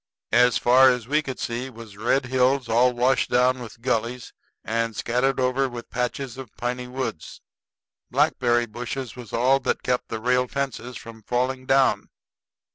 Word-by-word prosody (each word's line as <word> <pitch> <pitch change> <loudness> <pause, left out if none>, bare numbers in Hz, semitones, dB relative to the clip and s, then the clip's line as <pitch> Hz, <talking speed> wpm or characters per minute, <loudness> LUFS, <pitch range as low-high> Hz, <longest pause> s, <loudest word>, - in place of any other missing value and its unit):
As 125 0 +5
far 130 +2 +6
as 125 -2 -1
we 150 +3 +2
could 135 -3 -6
see 120 +3 -4
was 115 -4 -12
red 120 +5 +1
hills 130 +1 +2
all 120 +3 +4
washed 125 +2 +1
down 125 +1 +3
with 115 -1 -10
gullies 120 0 -2 0.3
and 115 +1 -1
scattered 125 +3 0
over 130 +1 +1
with 120 -1 -9
patches 125 +1 -3
of 130 -5 -10
piny 125 +1 -3
woods. 125 -9 -5 0.7
Blackberry 120 -1 +2
bushes 120 +2 -6
was 120 -4 -10
all 130 +3 +3
that - - -2
kept 125 0 -1
the 110 - -4
rail 125 +2 +1
fences 125 -2 -4
from 115 -1 -11
falling 130 +3 -2
down. 135 0 +3
125 Hz, 160 wpm, -24 LUFS, 120-130 Hz, 0.7 s, far